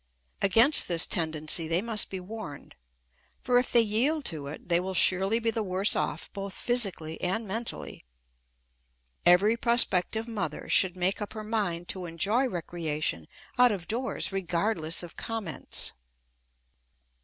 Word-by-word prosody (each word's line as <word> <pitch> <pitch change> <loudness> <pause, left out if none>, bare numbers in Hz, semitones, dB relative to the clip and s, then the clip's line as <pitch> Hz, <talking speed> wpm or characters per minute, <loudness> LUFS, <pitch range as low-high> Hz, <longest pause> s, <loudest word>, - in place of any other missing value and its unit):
Against 225 +9 +4
this 170 -2 +4
tendency 160 0 -2
they 165 +2 +1
must 220 +1 0
be 190 - -5
warned, 180 -6 -9 0.7
for 245 -1 +3
if 250 - -2
they 240 - +7
yield 250 +8 0
to 150 -3 -1
it 145 - -9
they 170 -1 +3
will 190 +1 -4
surely 190 +5 +4
be 230 -1 0
the 225 - -2
worse 190 0 +1
off - - -3
both 195 -1 -6
physically 195 -10 0
and 205 +5 -2
mentally. 190 - -5 1.2
Every 195 +6 +5
prospective 230 -2 +2
mother 195 -9 -4
should 185 -2 +3
make 185 +3 0
up 210 - -5
her 215 - -6
mind 200 -6 -2
to 185 -3 -3
enjoy 210 - +1
recreation 155 - -3 0.3
out 250 -1 +6
of 185 -4 -4
doors 245 +1 -2
regardless 175 -2 -1
of 175 - -11
comments. 220 -8 -2
195 Hz, 145 wpm, -28 LUFS, 170-225 Hz, 1.2 s, they